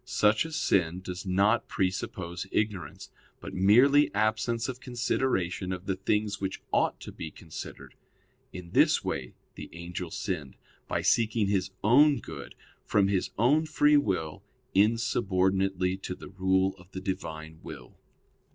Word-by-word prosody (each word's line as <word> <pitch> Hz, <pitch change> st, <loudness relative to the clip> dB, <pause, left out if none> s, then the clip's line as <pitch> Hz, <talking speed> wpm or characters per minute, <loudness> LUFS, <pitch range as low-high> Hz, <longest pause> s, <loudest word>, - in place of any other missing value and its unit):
Such 110 Hz, +1 st, +2 dB
a 165 Hz, -, -7 dB
sin 90 Hz, -, +1 dB
does 95 Hz, +1 st, -6 dB
not 100 Hz, +5 st, +2 dB
presuppose 95 Hz, -1 st, -3 dB
ignorance, 100 Hz, -8 st, -3 dB, 0.3 s
but -, -, -8 dB
merely 125 Hz, +10 st, +5 dB
absence 110 Hz, +3 st, 0 dB
of 130 Hz, -1 st, -5 dB
consideration 120 Hz, -8 st, -1 dB
of 90 Hz, 0 st, -5 dB
the 95 Hz, -, -1 dB
things 105 Hz, +2 st, -1 dB
which 95 Hz, -1 st, -3 dB
ought -, -, +2 dB
to -, -, -8 dB
be 80 Hz, -, -7 dB
considered. -, -, -9 dB, 0.6 s
In 90 Hz, -2 st, -9 dB
this -, -, +4 dB
way -, -, -4 dB, 0.2 s
the -, -, -9 dB
angel 85 Hz, +1 st, -6 dB
sinned, 80 Hz, -7 st, -4 dB, 0.3 s
by -, -, -1 dB
seeking 110 Hz, -3 st, +2 dB
his 95 Hz, -2 st, 0 dB
own 140 Hz, +6 st, +6 dB
good, -, -, -9 dB, 0.3 s
from 100 Hz, -2 st, +2 dB
his 95 Hz, -2 st, 0 dB
own 145 Hz, +8 st, +3 dB
free 150 Hz, -1 st, +4 dB
will, 90 Hz, -, 0 dB, 0.3 s
insubordinately 95 Hz, -4 st, +1 dB
to 95 Hz, -1 st, -6 dB
the -, -, -11 dB
rule 95 Hz, 0 st, +1 dB
of 90 Hz, +1 st, -17 dB
the 95 Hz, -, -4 dB
Divine 80 Hz, -4 st, -5 dB
will. -, -, -10 dB
95 Hz, 140 wpm, -28 LUFS, 90-115 Hz, 0.6 s, own